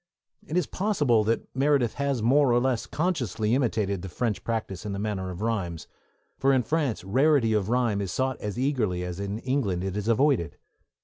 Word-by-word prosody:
It 160 Hz, -, -2 dB
is 180 Hz, -, +2 dB
possible 145 Hz, -, +1 dB
that 115 Hz, +2 st, 0 dB
Meredith 135 Hz, -4 st, +2 dB
has 140 Hz, -5 st, -1 dB
more 135 Hz, +2 st, +4 dB
or 120 Hz, -, +4 dB
less 125 Hz, -2 st, 0 dB
consciously 130 Hz, -10 st, -1 dB
imitated 110 Hz, -7 st, 0 dB
the 95 Hz, -, -6 dB
French 110 Hz, +3 st, -2 dB
practice 110 Hz, -5 st, -3 dB
in 105 Hz, -2 st, -4 dB
the -, -, -3 dB
matter 100 Hz, -2 st, -3 dB
of 90 Hz, +1 st, -7 dB
rhymes, 95 Hz, -8 st, -2 dB, 0.5 s
for 135 Hz, -, +3 dB
in 130 Hz, -2 st, +3 dB
France 145 Hz, -, -1 dB
rarity 130 Hz, +3 st, +3 dB
of 105 Hz, -1 st, 0 dB
rhyme 120 Hz, -4 st, +1 dB
is 95 Hz, -3 st, -3 dB
sought 130 Hz, +4 st, -1 dB
as 105 Hz, +1 st, -4 dB
eagerly 120 Hz, -10 st, 0 dB
as 90 Hz, 0 st, -5 dB
in 100 Hz, +1 st, -3 dB
England 115 Hz, -8 st, -1 dB
it 95 Hz, 0 st, -3 dB
is 105 Hz, +1 st, -3 dB
avoided. 115 Hz, -, +2 dB
115 Hz, 190 wpm, -26 LUFS, 100-135 Hz, 0.5 s, more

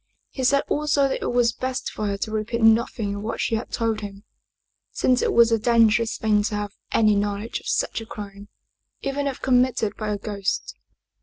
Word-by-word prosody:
He 265 Hz, -, -5 dB
said 275 Hz, +2 st, +3 dB
also 295 Hz, -2 st, +2 dB
that 270 Hz, -, -3 dB
it -, -, -1 dB
was 240 Hz, -1 st, +2 dB
best 260 Hz, +1 st, -3 dB
for 215 Hz, -, -3 dB
her 200 Hz, -1 st, -2 dB
to 215 Hz, +2 st, -4 dB
repeat 220 Hz, +2 st, -2 dB
nothing 225 Hz, -2 st, +3 dB
of 200 Hz, -, -5 dB
what 220 Hz, +2 st, -4 dB
she -, -, -1 dB
had 225 Hz, +2 st, -2 dB
told 225 Hz, -2 st, -1 dB
him, 200 Hz, -1 st, -8 dB, 0.7 s
since 255 Hz, -1 st, +2 dB
it -, -, +1 dB
was 235 Hz, 0 st, +5 dB
a 225 Hz, -, +3 dB
dangerous 230 Hz, 0 st, +3 dB
thing 215 Hz, -1 st, +2 dB
to 210 Hz, -, -2 dB
have 205 Hz, -1 st, -4 dB, 0.2 s
any 215 Hz, -2 st, +4 dB
knowledge 205 Hz, +2 st, -2 dB
of -, -, -13 dB
such -, -, 0 dB
a 225 Hz, -, -10 dB
crime, 200 Hz, -1 st, -9 dB, 0.6 s
even 280 Hz, +1 st, -1 dB
if 270 Hz, -, -5 dB
committed 250 Hz, -4 st, +2 dB
by 215 Hz, -1 st, -3 dB
a 205 Hz, -, -1 dB
ghost. 200 Hz, -1 st, -3 dB
225 Hz, 205 wpm, -23 LUFS, 210-245 Hz, 0.7 s, was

